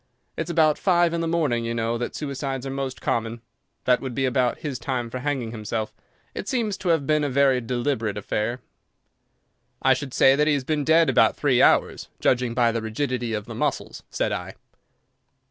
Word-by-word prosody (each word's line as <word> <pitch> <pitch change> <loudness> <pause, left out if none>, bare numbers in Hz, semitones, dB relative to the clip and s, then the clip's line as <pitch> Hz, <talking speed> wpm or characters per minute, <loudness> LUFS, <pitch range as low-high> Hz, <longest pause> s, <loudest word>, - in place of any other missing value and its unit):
It's 165 +1 -4
about 155 -3 +3
five 175 -3 +3
in 170 - -1
the 165 - -1
morning, 150 -8 0
you 115 0 -3
know, 115 0 -1
that 120 - -4
suicides 135 -2 -4
are 135 - -4
most 135 -1 -4
common. 115 0 -1 0.4
That 125 -1 +3
would 130 -3 -5
be 135 - +1
about 125 -1 +1
his 140 -4 -4
time 120 -2 -3
for 130 - -4
hanging 130 -4 -2
himself. 110 -1 -4 0.4
It - - -6
seems 230 -7 0
to 185 - -3
have 160 -4 +2
been 150 +1 +2
a 145 - 0
very 135 -1 +3
deliberate 120 -3 -2
affair." 110 +4 -2 1.2
"I - - +4
should 135 -3 -5
say 135 0 +6
that 150 +1 +2
he 150 - +3
has 140 - -2
been 150 +2 -1
dead 160 +2 +4
about 115 -4 +4
three 130 -4 +2
hours, - - +3
judging 125 -2 +1
by 120 -2 +3
the 115 0 -2
rigidity 120 +1 -2
of 105 -1 -4
the - - -8
muscles," - - -3
said - - -1
I. - - -5
130 Hz, 195 wpm, -24 LUFS, 115-150 Hz, 1.2 s, say